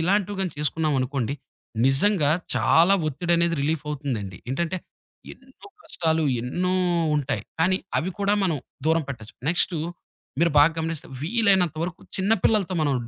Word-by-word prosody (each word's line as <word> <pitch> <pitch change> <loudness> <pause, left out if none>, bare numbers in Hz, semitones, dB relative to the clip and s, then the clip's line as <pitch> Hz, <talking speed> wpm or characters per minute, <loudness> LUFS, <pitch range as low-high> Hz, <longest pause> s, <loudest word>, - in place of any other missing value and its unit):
ఇలాంటివి 200 +3 +1
గాని 185 -4 -1
చేసుకున్నామనుకోండి, 140 -4 0 0.5
నిజంగా 145 +3 +3 0.2
చాలా 170 +4 +4
ఒత్తిడి 170 +4 -1
అనేది 170 0 +2
రిలీఫ్ 155 +1 -1
అవుతుందండి. 125 -11 -4
ఏంటంటే 170 +6 -1 0.6
ఎన్నో 265 +8 -16 0.2
కష్టాలు 160 -2 0 0.2
ఎన్నో 175 +10 -1 0.4
ఉంటాయి 135 -7 -2 0.2
కానీ 185 +3 +3 0.2
అవి 180 - -2
కూడా 200 0 +2
మనం 170 -5 +1 0.3
దూరం 160 +1 +3
పెట్టొచ్చు. 110 -6 -8
నెక్స్టు 175 +1 +1 0.6
మీరు 170 0 +4
బాగా 150 +3 +6
గమనిస్తే 160 -1 -3
వీలైనంత 190 -3 +2
వరకు 175 +1 -4 0.2
చిన్న 195 +3 +1
పిల్లలతో 195 -4 +2
మనం 145 -2 +1
165 Hz, 135 wpm, -24 LUFS, 145-185 Hz, 0.6 s, బాగా